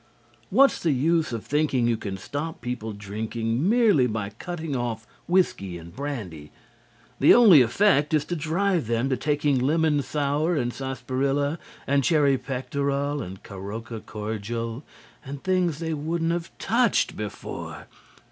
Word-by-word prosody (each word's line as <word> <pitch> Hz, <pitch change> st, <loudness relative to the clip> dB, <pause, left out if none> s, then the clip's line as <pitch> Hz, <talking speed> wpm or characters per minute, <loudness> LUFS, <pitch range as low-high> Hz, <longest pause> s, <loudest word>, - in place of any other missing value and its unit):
What's 270 Hz, +7 st, +4 dB
the 160 Hz, -4 st, +2 dB
use 160 Hz, +4 st, +1 dB
of 115 Hz, -2 st, -5 dB
thinking 145 Hz, -4 st, +1 dB
you 120 Hz, -1 st, +2 dB
can 100 Hz, -3 st, -5 dB
stop 145 Hz, -, -5 dB
people 120 Hz, -2 st, -4 dB
drinking 110 Hz, -, -2 dB
merely 215 Hz, -, +4 dB
by 110 Hz, -3 st, -3 dB
cutting 160 Hz, +5 st, -5 dB
off 115 Hz, -2 st, -3 dB, 0.2 s
whiskey 165 Hz, -, +1 dB
and 85 Hz, 0 st, -12 dB
brandy? 105 Hz, -, -6 dB, 0.7 s
The -, -, +7 dB
only 205 Hz, -, +8 dB
effect 145 Hz, -, +3 dB
is 150 Hz, -2 st, +2 dB
to 175 Hz, -, -3 dB
drive 170 Hz, -, 0 dB
them 120 Hz, +3 st, 0 dB
to -, -, +3 dB
taking 145 Hz, 0 st, +1 dB
lemon 150 Hz, +2 st, +2 dB
sour 150 Hz, +4 st, 0 dB
and 120 Hz, -4 st, -1 dB
sarsaparilla 135 Hz, +3 st, -1 dB, 0.3 s
and 140 Hz, 0 st, +2 dB
cherry 140 Hz, -1 st, +3 dB
pectoral 140 Hz, +2 st, -2 dB
and 95 Hz, -3 st, -8 dB
caroka 110 Hz, +4 st, -7 dB
cordial 115 Hz, +3 st, -4 dB, 0.4 s
and 140 Hz, +1 st, -8 dB
things 180 Hz, -4 st, +1 dB
they 160 Hz, 0 st, -3 dB
wouldn't 165 Hz, +2 st, -1 dB
have 170 Hz, 0 st, -2 dB
touched 235 Hz, +2 st, +2 dB
before. 105 Hz, -2 st, -6 dB
140 Hz, 140 wpm, -25 LUFS, 115-160 Hz, 0.7 s, only